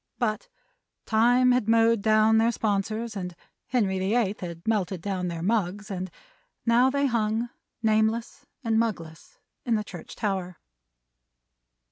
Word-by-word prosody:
But 230 Hz, -, -2 dB, 0.6 s
Time 245 Hz, +3 st, +4 dB
had 245 Hz, -3 st, +1 dB
mowed 230 Hz, -1 st, +4 dB
down 215 Hz, +1 st, +4 dB
their 230 Hz, +1 st, +3 dB
sponsors, 215 Hz, +1 st, -2 dB
and 180 Hz, -3 st, -5 dB, 0.3 s
Henry 200 Hz, -7 st, +1 dB
the 190 Hz, +4 st, 0 dB
Eighth 215 Hz, -4 st, +1 dB
had 170 Hz, 0 st, -7 dB
melted 195 Hz, -5 st, 0 dB
down 185 Hz, 0 st, -3 dB
their 170 Hz, -1 st, -4 dB
mugs; 205 Hz, 0 st, -1 dB
and 185 Hz, -1 st, -3 dB, 0.6 s
they 230 Hz, -, +3 dB
now 250 Hz, +3 st, +5 dB
hung, 235 Hz, -4 st, 0 dB, 0.3 s
nameless 220 Hz, +5 st, 0 dB, 0.2 s
and 225 Hz, -2 st, +2 dB
mugless, 165 Hz, -8 st, -4 dB, 0.3 s
in 235 Hz, -2 st, +1 dB
the 210 Hz, -, -1 dB
church 180 Hz, -4 st, -10 dB
tower. 190 Hz, -5 st, -2 dB
215 Hz, 135 wpm, -26 LUFS, 190-230 Hz, 0.6 s, now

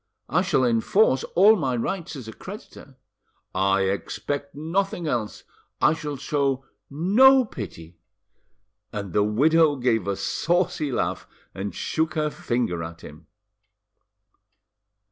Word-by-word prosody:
"I -, -, +2 dB
shall 130 Hz, -, +2 dB
enforce 130 Hz, -, +2 dB
all 205 Hz, +5 st, +7 dB
my 135 Hz, -, -1 dB
rights 170 Hz, +8 st, -3 dB
as 130 Hz, -5 st, -8 dB
a 110 Hz, -, -7 dB
creditor." 185 Hz, -8 st, -11 dB, 0.6 s
"I 95 Hz, +1 st, +2 dB
expect 140 Hz, +9 st, -3 dB
nothing 175 Hz, +5 st, -2 dB
else." 120 Hz, -8 st, -3 dB, 0.4 s
"I 150 Hz, -, +4 dB
shall 150 Hz, -3 st, -5 dB
show 135 Hz, -1 st, -1 dB, 0.2 s
no 240 Hz, -, +5 dB
pity." 85 Hz, -, -9 dB, 0.9 s
And 100 Hz, -4 st, -5 dB
the 105 Hz, -, +3 dB
widow 150 Hz, +8 st, +3 dB
gave 120 Hz, -6 st, 0 dB
a 100 Hz, -, 0 dB
saucy 165 Hz, -, 0 dB
laugh 120 Hz, -, -2 dB, 0.3 s
and 100 Hz, +1 st, -5 dB
shook 160 Hz, +1 st, -1 dB
her 150 Hz, -1 st, 0 dB
finger 120 Hz, -12 st, -2 dB
at 85 Hz, +1 st, -8 dB
him. 75 Hz, +1 st, -13 dB
140 Hz, 125 wpm, -24 LUFS, 105-165 Hz, 0.9 s, all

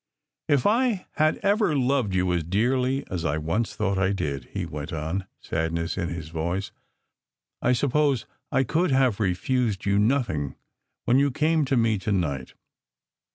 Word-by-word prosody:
"If 140 Hz, -4 st, +2 dB
I 230 Hz, -3 st, +2 dB
had 155 Hz, 0 st, +3 dB
ever 200 Hz, -6 st, +2 dB
loved 130 Hz, -6 st, +1 dB
you 90 Hz, -1 st, +2 dB
as 85 Hz, -2 st, 0 dB
dearly 125 Hz, -, +1 dB
as 90 Hz, -3 st, -2 dB
I 80 Hz, -2 st, 0 dB
once 85 Hz, +9 st, -1 dB
thought 100 Hz, -2 st, 0 dB
I 95 Hz, +1 st, +2 dB
did," 70 Hz, -9 st, -3 dB
he 95 Hz, +5 st, -4 dB
went 75 Hz, +1 st, -6 dB
on, 80 Hz, +4 st, -3 dB
sadness 85 Hz, +1 st, -2 dB
in 85 Hz, -3 st, -2 dB
his 80 Hz, -2 st, -6 dB
voice, 85 Hz, +4 st, -2 dB, 0.9 s
"I 125 Hz, -, +3 dB
suppose 140 Hz, 0 st, +1 dB, 0.3 s
I 135 Hz, -, +3 dB
could 165 Hz, +6 st, +1 dB
have 130 Hz, -5 st, +2 dB
refused 105 Hz, +2 st, 0 dB
you 100 Hz, 0 st, +3 dB
nothing 105 Hz, -, 0 dB, 0.5 s
when 125 Hz, +3 st, +4 dB
you 140 Hz, 0 st, +3 dB
came 155 Hz, +3 st, +1 dB
to 135 Hz, -1 st, +1 dB
me 115 Hz, -3 st, +2 dB
to 100 Hz, +3 st, -2 dB
night. 70 Hz, -9 st, -1 dB
105 Hz, 160 wpm, -25 LUFS, 85-135 Hz, 0.9 s, when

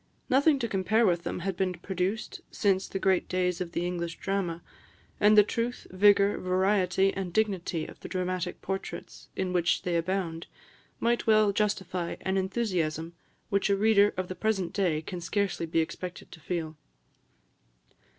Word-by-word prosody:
"Nothing 280 Hz, +3 st, +5 dB
to 240 Hz, -3 st, -2 dB
compare 215 Hz, +3 st, +2 dB
with 175 Hz, -3 st, +2 dB
them 175 Hz, -, -4 dB
had 190 Hz, +1 st, -2 dB
been 185 Hz, 0 st, 0 dB
produced 185 Hz, +5 st, -3 dB
since 195 Hz, -2 st, +1 dB
the -, -, -4 dB
great 190 Hz, -1 st, +1 dB
days 180 Hz, 0 st, 0 dB
of 175 Hz, -1 st, -4 dB
the 175 Hz, -, -1 dB
English 170 Hz, -2 st, -3 dB
drama; 185 Hz, -4 st, -2 dB, 0.6 s
and 210 Hz, +1 st, +5 dB
the 210 Hz, -, +10 dB
truth, 230 Hz, +4 st, -3 dB
vigour, 200 Hz, +1 st, +4 dB
variety, 190 Hz, 0 st, +2 dB
and 190 Hz, -2 st, -4 dB
dignity 185 Hz, -5 st, 0 dB
of -, -, -12 dB
the -, -, -9 dB
dramatic 185 Hz, -1 st, -3 dB
portraits, 195 Hz, 0 st, -6 dB
in 185 Hz, -1 st, -2 dB
which 175 Hz, -1 st, +1 dB
they 175 Hz, -1 st, -1 dB
abound, 170 Hz, -1 st, -2 dB, 0.5 s
might 235 Hz, 0 st, +1 dB
well 215 Hz, -2 st, +5 dB
justify 190 Hz, -4 st, -1 dB
an 190 Hz, -, -1 dB
enthusiasm 185 Hz, -5 st, -1 dB, 0.4 s
which 200 Hz, 0 st, +1 dB
a 200 Hz, -, +4 dB
reader 205 Hz, -1 st, +5 dB
of 185 Hz, -1 st, -2 dB
the 185 Hz, -, -4 dB
present 190 Hz, -1 st, -1 dB
day 170 Hz, -6 st, 0 dB
can 180 Hz, +1 st, -6 dB
scarcely 190 Hz, -1 st, -1 dB
be 165 Hz, 0 st, +2 dB
expected 180 Hz, +2 st, -6 dB
to 165 Hz, -, -11 dB
feel. 160 Hz, -2 st, -4 dB
185 Hz, 160 wpm, -28 LUFS, 175-200 Hz, 0.6 s, the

